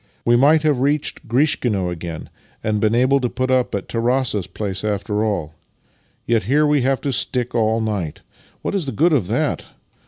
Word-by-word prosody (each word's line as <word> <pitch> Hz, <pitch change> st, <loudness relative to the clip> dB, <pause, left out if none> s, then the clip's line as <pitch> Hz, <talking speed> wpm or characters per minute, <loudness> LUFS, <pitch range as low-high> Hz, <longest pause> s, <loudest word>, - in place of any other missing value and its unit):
We 120 Hz, -, +4 dB
might 150 Hz, +5 st, +4 dB
have 150 Hz, -4 st, +2 dB
reached 145 Hz, +1 st, 0 dB
Grishkino 115 Hz, -, +1 dB
again, 85 Hz, -2 st, -7 dB, 0.3 s
and 105 Hz, -1 st, 0 dB
been 110 Hz, +1 st, +2 dB
able 130 Hz, +3 st, +3 dB
to 125 Hz, -2 st, -1 dB
put 130 Hz, +1 st, -2 dB
up 130 Hz, -4 st, +1 dB
at 100 Hz, -, -4 dB
Tarass's 115 Hz, -4 st, 0 dB
place 95 Hz, 0 st, -4 dB
after 105 Hz, 0 st, -1 dB
all. 90 Hz, -8 st, -2 dB, 0.7 s
Yet 115 Hz, -4 st, +1 dB
here 145 Hz, +7 st, +3 dB
we 150 Hz, -2 st, +2 dB
have 135 Hz, +1 st, +1 dB
to 140 Hz, -, -2 dB
stick 125 Hz, -1 st, -1 dB
all 110 Hz, -1 st, +1 dB
night! 100 Hz, -8 st, -3 dB, 0.4 s
What -, -, -2 dB
is 185 Hz, -7 st, -2 dB
the 135 Hz, -, -3 dB
good 160 Hz, +8 st, +3 dB
of 120 Hz, -12 st, +1 dB
that? -, -, -1 dB
120 Hz, 185 wpm, -20 LUFS, 105-135 Hz, 0.7 s, We